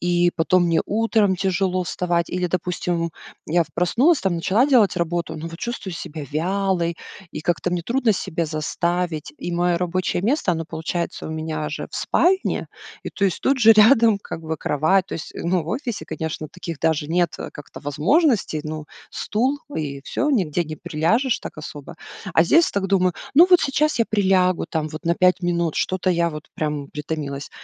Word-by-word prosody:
и 175 0 +2
потом 175 +2 +3
мне 165 -1 +2
утром 215 -2 +2
тяжело 185 -1 0
вставать. 170 0 -1
Или, 180 0 -1
допустим, 175 -1 -2 0.4
я 170 +1 +2
проснулась, 255 - +3
там, 190 -3 0
начала 200 +10 +2
делать 230 -10 +4
работу, 170 -1 -2
но 165 +2 -6
вот 165 +1 -10
чувствую 235 -6 -5
себя 160 -3 -6
вялой, 175 +1 0 0.4
и 150 - -5
как-то 175 +2 -1
мне 175 -1 -1
трудно 235 +1 +1
себя 170 -4 -2
заставить. 160 0 -2
И - - -4
моё 175 0 +1
рабочее 180 0 -1
место- 235 - +1
оно 165 0 -3
получается 165 +2 -4
у - - -5
меня 155 -1 -3
же - - -5
в - - -6
спальне, 380 +2 +1 0.3
и, - - -6
то 200 - -1
есть, 190 - 0
тут 270 0 +2
же 225 -2 +8
рядом, 225 -1 +6
как 165 - -7
бы, 160 0 -3
кровать. 160 +7 +1
То - - -6
есть, 160 - -7
ну, 175 0 0
в 160 - -10
офисе, 240 +1 -3
конечно, 155 -1 -5
таких 170 -3 -7
даже 155 -2 0
нет 175 +1 +2 0.2
как-то 145 - -11
возможностей: 185 - +1
ну, 155 0 -5 0.3
стул- 255 +7 -1 0.2
и 140 -3 -3
всё, 295 - -1
нигде 175 - +1
не 155 0 -7
приляжешь 225 - +1
так - - -8
особо. 145 -2 -8 0.4
А 165 - +6
здесь 330 - +4
так 195 -1 -1
думаю: 185 -2 +2 0.2
"Ну, 340 +5 +8
вот 360 -1 +6
сейчас 295 0 +1
я 230 - +4
прилягу, 190 -3 +2
там, 155 -1 -2
вот 155 +2 -8
на 170 +1 +2
5 180 0 +3
минут, 170 -2 0
что-то 185 0 0
я 170 -1 +2
вот, 150 0 -9
прям, 150 -2 -3
притомилась". 150 -2 -5
175 Hz, 180 wpm, -22 LUFS, 160-200 Hz, 0.4 s, же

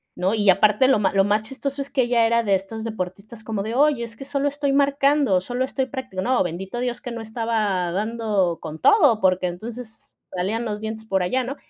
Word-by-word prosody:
¿no? 185 +3 0
Y 205 -2 +2
aparte 210 +6 +4
lo 265 -6 +4
ma 200 - +1
lo 195 0 +4
más 205 +2 +1
chistoso 275 +3 -5
es 275 - -6
que 265 - +1
ella 240 -1 +3
era 235 +1 +2
de 200 -3 +2
estos 195 +4 -5
deportistas 215 +1 -6
como 215 -3 -2
de: 220 +3 -4
"Oye, 285 -3 +3
es 230 0 -9
que 270 - -8
solo 285 0 0
estoy 285 -1 -1
marcando, 280 -5 +3
solo 245 +7 -3
estoy 265 0 -2
practi", 255 -6 -8
no, 250 +3 +2
bendito 185 +6 -5
Dios 245 -1 -2
que 245 -4 -6
no 230 - -5
estaba 220 -5 -1
dando 205 -4 0
con 155 +1 -7
todo, 290 - +5
porque 185 -1 +2
entonces 220 +6 -9 0.2
salían 205 +6 -1
los 210 -2 -4
dientes 220 0 -5
por 195 -4 0
allá, 255 +8 0
¿no? 270 +3 -4
225 Hz, 220 wpm, -23 LUFS, 195-255 Hz, 0.2 s, todo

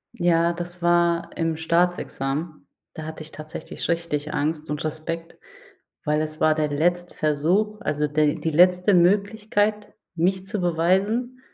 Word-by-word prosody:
Ja, 170 -1 +3
das 175 +1 -6
war 170 0 +2
im 165 -1 0
Staatsexamen. 160 -3 -1 0.3
Da 155 - -7
hatte 160 0 -7
ich 155 - -12
tatsächlich 155 0 -7
richtig 160 -3 -2
Angst 155 +1 -2
und 150 +1 -3
Respekt, 160 +2 -5 0.7
weil 150 +1 +1
es 155 0 -5
war 155 - +5
der 155 -1 0
letzte 175 +4 0
Versuch, 180 +9 +1
also, 150 -7 0
der 150 0 +2
die 160 - -2
letzte 180 +4 +4
Möglichkeit, 205 +3 +2 0.2
mich 185 +3 0
zu 210 +1 -3
beweisen 190 +9 +1
170 Hz, 140 wpm, -24 LUFS, 155-180 Hz, 0.7 s, war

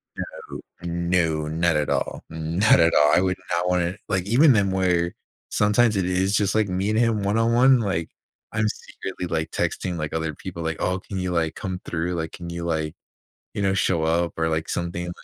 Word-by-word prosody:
No, - - -7 0.2
no. 85 -2 0
Not 80 +1 +1
at 75 -1 0
all. - - -2
Not 80 +6 +3
at 85 0 +4
all. 75 0 +5
I - - +4
would 95 -1 0
not 85 +1 +1
wanna 90 +1 0
like, 95 -3 -1
even 130 +7 +5
then 100 -3 +2
where 90 -2 +1 0.4
sometimes 105 +2 +3
it 95 -2 +1
is 95 +2 +1
just, 100 -1 +1
like, 110 -2 +2
meeting 100 +4 0
him 115 -3 +1
one 100 +2 +1
on 115 +1 +2
one, 130 +2 +6
like, 95 -7 -1 0.4
I'm 110 0 +1
secretly, 95 -3 -6
like, 80 -2 -2
texting, 90 -2 -2
like, 75 -1 -4
other 80 -1 -2
people, 85 0 -7
like, 80 0 -2
oh, 90 +1 0
can 95 +1 -7
you, 90 -1 -2
like, 80 -2 0
come 95 -1 -4
through? 85 +1 -2
Like, 80 -1 -3
can 85 -1 -7
you, 85 0 -5
like, 80 -2 -2 0.6
you 100 - -2
know, 95 -1 +2
show 85 -3 +1
up 85 +2 +1
or, 80 0 +1
like, 80 0 -1
something? 85 0 -3
90 Hz, 205 wpm, -24 LUFS, 80-100 Hz, 0.6 s, one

